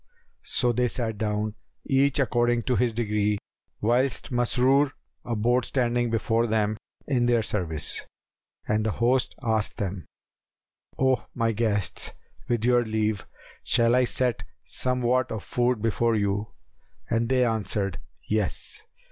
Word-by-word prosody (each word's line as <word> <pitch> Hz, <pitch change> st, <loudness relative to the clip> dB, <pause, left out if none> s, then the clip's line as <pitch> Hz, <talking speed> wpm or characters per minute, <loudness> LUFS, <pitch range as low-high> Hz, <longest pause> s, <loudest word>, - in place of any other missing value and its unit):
So 125 Hz, -1 st, +2 dB
they 125 Hz, +1 st, +1 dB
sat 110 Hz, -3 st, -3 dB
down, 105 Hz, 0 st, -1 dB, 0.3 s
each 135 Hz, +1 st, +2 dB
according 120 Hz, -3 st, +2 dB
to 125 Hz, -, +1 dB
his 120 Hz, 0 st, +2 dB
degree, 105 Hz, -2 st, 0 dB, 0.4 s
whilst 125 Hz, +5 st, +1 dB
Masrur 130 Hz, +3 st, +2 dB, 0.3 s
abode 120 Hz, +2 st, +1 dB
standing 120 Hz, -2 st, 0 dB
before 115 Hz, +1 st, +1 dB
them 110 Hz, -1 st, +1 dB, 0.3 s
in 125 Hz, -4 st, +1 dB
their 120 Hz, -2 st, +3 dB
service; 80 Hz, -8 st, +1 dB, 0.6 s
and 105 Hz, 0 st, +1 dB
the 110 Hz, -1 st, 0 dB
host 125 Hz, +2 st, +1 dB
asked 110 Hz, -2 st, 0 dB
them, 95 Hz, -3 st, -4 dB, 0.9 s
"O 130 Hz, -1 st, +1 dB
my 115 Hz, -1 st, +1 dB
guests, 105 Hz, -3 st, -1 dB, 0.3 s
with 120 Hz, -2 st, 0 dB
your 120 Hz, 0 st, +4 dB
leave, 110 Hz, -2 st, -1 dB, 0.4 s
shall 115 Hz, -1 st, +3 dB
I 125 Hz, 0 st, +4 dB
set 125 Hz, 0 st, -1 dB, 0.2 s
somewhat 125 Hz, 0 st, 0 dB
of 110 Hz, -3 st, -4 dB
food 120 Hz, -2 st, 0 dB
before 115 Hz, +1 st, +2 dB
you?" 100 Hz, 0 st, 0 dB, 0.6 s
and 115 Hz, 0 st, +1 dB
they 130 Hz, -1 st, +3 dB
answered, 105 Hz, -5 st, -1 dB, 0.2 s
"Yes." 105 Hz, -3 st, -2 dB
115 Hz, 130 wpm, -26 LUFS, 105-125 Hz, 0.9 s, your